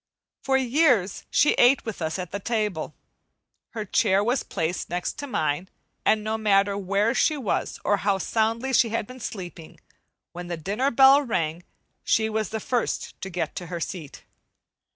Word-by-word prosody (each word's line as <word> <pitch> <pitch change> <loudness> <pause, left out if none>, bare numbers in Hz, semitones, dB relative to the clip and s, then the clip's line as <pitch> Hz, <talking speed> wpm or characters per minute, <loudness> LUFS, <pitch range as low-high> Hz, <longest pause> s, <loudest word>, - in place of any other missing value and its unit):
For 265 -1 +2
years 255 - +2
she 295 - +4
ate 250 +2 +5
with 220 -5 -6
us 160 +2 -2
at 180 -2 -6
the 200 - -3
table. 210 -8 -2 0.8
Her 215 -2 -3
chair 200 -1 +2
was 245 +4 +1
placed 165 +2 -3
next 175 - -3
to 285 - -5
mine, 155 - -1 0.3
and 215 -1 +2
no 220 +1 -2
matter 200 -2 +3
where 200 +3 +1
she 305 +4 +2
was 250 -8 -2
or 205 - +3
how 200 0 +1
soundly 225 +6 0
she 235 -1 +4
had 225 -1 -2
been 255 +3 -11
sleeping, 180 -7 -8 0.5
when 175 0 -7
the 170 -1 -4
dinner 205 - -1
bell 270 +2 +7
rang 170 - -2 0.4
she 220 0 +2
was 215 0 -1
the 220 - -3
first 240 +2 -2
to 190 - -5
get 180 -1 -3
to 175 - -5
her 170 0 -5
seat. 165 -3 -6
210 Hz, 175 wpm, -25 LUFS, 180-240 Hz, 0.8 s, bell